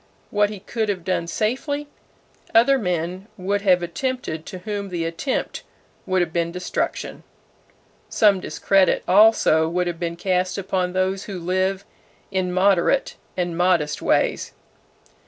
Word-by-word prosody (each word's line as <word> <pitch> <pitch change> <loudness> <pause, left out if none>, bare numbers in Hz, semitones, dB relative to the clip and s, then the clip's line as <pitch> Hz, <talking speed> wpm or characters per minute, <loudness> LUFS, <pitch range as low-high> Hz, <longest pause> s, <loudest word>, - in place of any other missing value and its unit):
What 205 0 +2
he 210 -2 -7
could 220 +1 -2
have 185 -4 -2
done 170 -2 -1
safely, 265 - -2 0.7
other 270 +4 +5
men 180 0 -2
would 200 +2 -1
have 180 -3 +3
attempted 175 -4 -3
to 185 - -6
whom 200 +1 -5
the 170 -2 -2
attempt 165 +11 -3 0.5
would 185 -1 +2
have 165 -1 -6
been 170 -1 0
destruction. 180 +1 -3 0.9
Some 205 -3 +4
discredit 195 +1 +2
also 185 -5 +5
would 180 +1 0
have 175 -1 -4
been 170 -1 -3
cast 185 +1 0
upon 185 -2 -1
those 190 +1 0
who 195 -3 -6
live 185 +2 -1 0.5
in 185 -2 -1
moderate 190 +7 +2 0.2
and 175 -2 -1
modest 175 -4 +1
ways. - - +1
185 Hz, 135 wpm, -22 LUFS, 175-205 Hz, 0.9 s, other